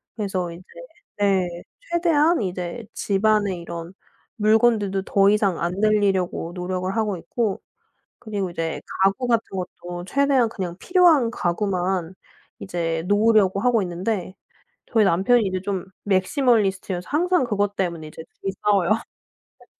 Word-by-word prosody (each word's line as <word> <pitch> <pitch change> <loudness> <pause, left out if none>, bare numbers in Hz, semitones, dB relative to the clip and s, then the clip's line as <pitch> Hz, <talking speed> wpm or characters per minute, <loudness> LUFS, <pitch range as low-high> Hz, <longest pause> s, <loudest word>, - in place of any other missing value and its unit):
그래서 190 -5 -2
이제 170 +2 -10 0.6
네 195 -3 +2 0.4
최대한 335 -2 +3
이제 185 +4 -4
집 200 +1 -1
안에 210 -3 +2
이런 170 0 -7 0.5
물건들도 215 -2 +3
더 195 0 +3
이상 205 -4 +1
안 175 - -1
늘리려고 200 -5 +1
노력을 185 +1 -3
하고 215 -4 0
있고. 215 +3 -2 0.6
그리고 205 -5 -3
이제 165 -1 -3 0.2
가구 220 +6 +1
같은 230 -2 +3
것도 175 -1 -6
최대한 275 +1 +2
그냥 180 -5 -5
필요한 335 - +4
가구만 185 -3 -1 0.4
이제 165 -3 -3
놓으려고 205 -1 +3
하고 245 -1 +3
있는데 185 +1 -3 0.5
저희 225 -3 +3
남편이 195 +7 +3
이제 185 -1 -2
좀 195 -2 -3 0.2
maximalist여서 195 -3 +1
항상 355 +3 +2
그것 205 -3 -1
때문에 170 -4 -2
이제 160 - -10
2 195 - -6
이 - - -7
싸워요. 200 -3 +2 0.7
네. - - -20
195 Hz, 310 characters per minute, -23 LUFS, 180-220 Hz, 0.7 s, 필요한